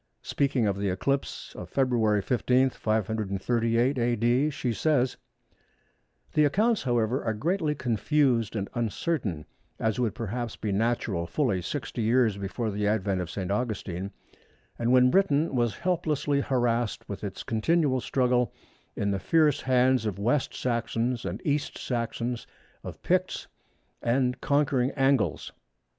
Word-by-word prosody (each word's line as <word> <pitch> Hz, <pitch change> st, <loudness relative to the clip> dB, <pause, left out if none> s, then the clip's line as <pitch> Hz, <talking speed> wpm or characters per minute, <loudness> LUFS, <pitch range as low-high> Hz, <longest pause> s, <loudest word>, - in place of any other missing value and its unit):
Speaking 135 Hz, -4 st, +1 dB
of 100 Hz, -1 st, 0 dB
the 100 Hz, -1 st, 0 dB
eclipse 135 Hz, +9 st, -2 dB
of -, -, -8 dB
February 115 Hz, -6 st, +2 dB
15, 130 Hz, +2 st, +2 dB
538 110 Hz, +4 st, 0 dB
A.D., 120 Hz, +4 st, +2 dB
she 130 Hz, -5 st, -2 dB
says:—"The 125 Hz, +1 st, -3 dB
accounts, 215 Hz, +10 st, +2 dB
however, 120 Hz, 0 st, 0 dB
are 110 Hz, -2 st, -1 dB
greatly 160 Hz, -, 0 dB
confused 120 Hz, -1 st, +1 dB
and 100 Hz, -2 st, -2 dB
uncertain, 115 Hz, -, -2 dB, 0.3 s
as 110 Hz, +1 st, 0 dB
would 115 Hz, -4 st, 0 dB
perhaps 120 Hz, 0 st, -4 dB
be 105 Hz, -, -3 dB
natural 100 Hz, -5 st, 0 dB
fully 110 Hz, -, 0 dB
60 120 Hz, -, -4 dB
years 115 Hz, -1 st, +3 dB
before 100 Hz, +3 st, -3 dB
the 105 Hz, +1 st, -1 dB
advent 100 Hz, -3 st, 0 dB
of 90 Hz, -, -5 dB
St. 95 Hz, +1 st, -4 dB
Augustine, 100 Hz, -4 st, -2 dB, 0.7 s
and 120 Hz, +1 st, +1 dB
when 125 Hz, 0 st, +6 dB
Britain 165 Hz, -6 st, +2 dB
was 120 Hz, -4 st, +1 dB
helplessly 155 Hz, -5 st, 0 dB
harassed 120 Hz, -4 st, 0 dB
with 100 Hz, -, -6 dB
its 100 Hz, -2 st, -5 dB
continual 130 Hz, +3 st, +1 dB
struggle 125 Hz, -1 st, +1 dB, 0.4 s
in 100 Hz, 0 st, 0 dB
the 100 Hz, -, -1 dB
fierce 155 Hz, +4 st, +3 dB
hands 130 Hz, -2 st, +3 dB
of 100 Hz, -, -3 dB
West 120 Hz, +7 st, +1 dB
Saxons 120 Hz, 0 st, -1 dB
and 95 Hz, +5 st, -3 dB
East 145 Hz, -1 st, -1 dB
Saxons, 120 Hz, 0 st, -3 dB, 0.4 s
of -, -, -9 dB
Picts -, -, 0 dB, 0.6 s
and 125 Hz, +1 st, +1 dB
conquering 140 Hz, -3 st, +2 dB
Angles. 135 Hz, -, +1 dB
120 Hz, 130 wpm, -27 LUFS, 110-135 Hz, 0.7 s, when